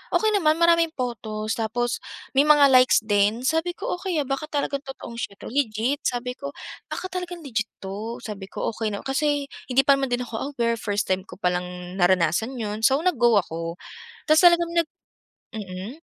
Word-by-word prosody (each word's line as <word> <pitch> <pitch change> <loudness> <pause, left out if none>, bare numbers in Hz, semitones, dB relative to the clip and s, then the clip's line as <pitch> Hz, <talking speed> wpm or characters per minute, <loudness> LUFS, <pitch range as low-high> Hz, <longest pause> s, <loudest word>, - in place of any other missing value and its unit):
okey 435 0 +3
naman 310 -5 +3
maraming 335 0 +5
photos 220 -4 -3
tapos, 240 +2 -1 0.4
may 275 - +6
mga 295 -2 +7
likes 255 0 +6
din 210 +3 +2
sabi 325 +2 +1
ko, - - -3
"Okey, 370 -3 -3
ah, - - -12
baka 275 +3 -2
talagang 285 -1 -1
totoong 250 -3 -8
siya 200 - -4
'to - - -9
legit," 255 0 0
sabi 250 0 -2
ko, 280 0 -6 0.4
"Baka 370 - -3
talagang 355 -2 -5
legit 225 -5 -2 0.2
'to," 210 +5 -5
sabi 200 -3 -6
ko, - - -2
okey 220 -2 -2
na 200 - -5
kasi 290 +1 0 0.2
hindi 270 +2 +5
pa 280 - +7
naman 270 -2 -2
din 245 0 0
ako 235 +6 -4
aware 235 -1 +1
first 205 0 -1
time 185 0 +1
ko - - -10
pa 180 - +1
lang 180 0 -5
naranasan 180 +7 +2
'yun 210 -1 -3
so 265 +5 +5
nag 360 -1 +1
go 240 -2 +5
ako 165 -1 -5 0.5
tapos 310 +2 +6
talagang 340 -1 +3
nag 315 - -23 0.7
mm. 200 - -7
245 Hz, 190 wpm, -24 LUFS, 210-290 Hz, 0.7 s, mga